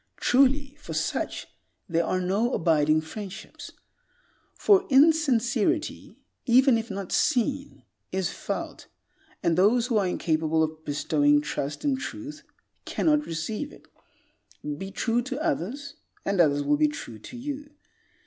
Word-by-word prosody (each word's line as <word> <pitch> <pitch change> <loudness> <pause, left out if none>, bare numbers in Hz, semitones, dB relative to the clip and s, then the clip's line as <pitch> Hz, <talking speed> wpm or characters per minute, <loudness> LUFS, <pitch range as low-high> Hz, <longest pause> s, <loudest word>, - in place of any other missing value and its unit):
Truly, 275 +2 +2
for 295 - -7
such - - -2 0.4
there 170 -2 +1
are 185 - 0
no 200 +7 0
abiding 155 -1 +3
friendships. 190 +4 -8 0.9
For 390 -2 +4
insincerity, 280 - +2 0.3
even 255 +1 +6
if 225 - -7
not 195 -2 -5
seen, 275 +1 0 0.3
is 190 -2 -1
felt, - - -5 0.6
and 165 - +2
those 215 +7 +4
who 240 -3 +1
are 195 - +1
incapable 160 -2 +1
of 155 0 -4
bestowing 145 0 +2
trust 145 0 -4
and 270 -2 +1
truth, 300 +2 -7 0.4
cannot 300 -2 +1
receive 215 - -4
it. - - -17 0.9
Be 195 +6 -6
true 230 +4 0
to 265 +2 -5
others, 285 - -2 0.3
and 195 -2 +2
others 145 -3 +3
will 145 +1 +2
be 150 0 +4
true 120 -7 -7
to 245 - -10
you. 290 +3 -6
220 Hz, 130 wpm, -26 LUFS, -, 0.9 s, even